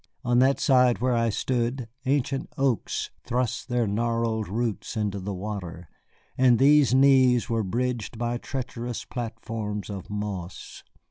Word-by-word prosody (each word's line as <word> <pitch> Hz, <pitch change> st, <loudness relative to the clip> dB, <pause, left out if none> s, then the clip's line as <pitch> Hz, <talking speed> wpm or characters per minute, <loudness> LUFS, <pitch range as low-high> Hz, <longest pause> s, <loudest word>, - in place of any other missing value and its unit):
On 120 Hz, 0 st, +3 dB
that 135 Hz, +2 st, +4 dB
side 125 Hz, -4 st, +4 dB
where 125 Hz, +1 st, +1 dB
I 115 Hz, -1 st, +2 dB
stood 120 Hz, +2 st, -1 dB, 0.2 s
ancient 135 Hz, 0 st, 0 dB
oaks 135 Hz, -4 st, 0 dB
thrust 125 Hz, 0 st, -2 dB
their 120 Hz, -1 st, +1 dB
gnarled 115 Hz, +1 st, -1 dB
roots 110 Hz, +1 st, -3 dB
into 100 Hz, -2 st, -1 dB
the 100 Hz, +2 st, -4 dB
water, 90 Hz, -4 st, -6 dB, 0.5 s
and 125 Hz, -2 st, +5 dB
these 145 Hz, 0 st, +5 dB
knees 130 Hz, -3 st, +4 dB
were 115 Hz, -1 st, +1 dB
bridged 115 Hz, +2 st, -2 dB
by 120 Hz, +1 st, -2 dB
treacherous 120 Hz, -3 st, -5 dB
platforms 110 Hz, -3 st, -5 dB
of 95 Hz, -3 st, -7 dB
moss. 100 Hz, -4 st, -5 dB
120 Hz, 135 wpm, -26 LUFS, 105-125 Hz, 0.5 s, and